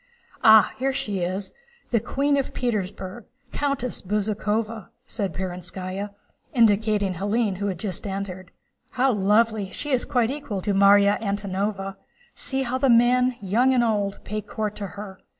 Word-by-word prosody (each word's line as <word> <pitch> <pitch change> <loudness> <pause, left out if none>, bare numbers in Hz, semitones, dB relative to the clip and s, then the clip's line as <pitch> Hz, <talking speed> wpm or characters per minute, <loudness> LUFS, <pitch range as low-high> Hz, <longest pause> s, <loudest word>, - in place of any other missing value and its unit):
"Ah, 220 -2 +7
here 270 +1 0
she 205 -7 -2
is, 185 +3 -3 0.4
the 235 - +3
Queen 280 +5 0
of 275 -2 -2
Petersburg, 205 -3 -3 0.3
Countess 275 -4 -2
Bezúkhova," 210 +1 -2 0.2
said 200 -7 -3
Perónskaya, 185 +3 -5 0.5
indicating 210 -3 +3
Hélène 205 +2 0
who 205 +1 -2
had 190 -3 -2
just 190 +1 -3
entered. 190 -2 -5 0.4
"How 260 +1 +3
lovely! 210 0 +2
She 290 +9 -5
is 255 -2 +1
quite 245 -3 +1
equal 280 -9 -4
to 205 - 0
Márya 200 +1 +5
Antónovna. 200 -1 -2 0.4
See 270 0 -2
how 255 +1 -2
the 270 0 +3
men, 250 +1 +4
young 240 +7 +2
and 245 - +4
old, 205 -3 0
pay 215 +1 -3
court 215 0 -4
to 200 - -4
her. 195 -2 -8
210 Hz, 150 wpm, -24 LUFS, 195-240 Hz, 0.5 s, Ah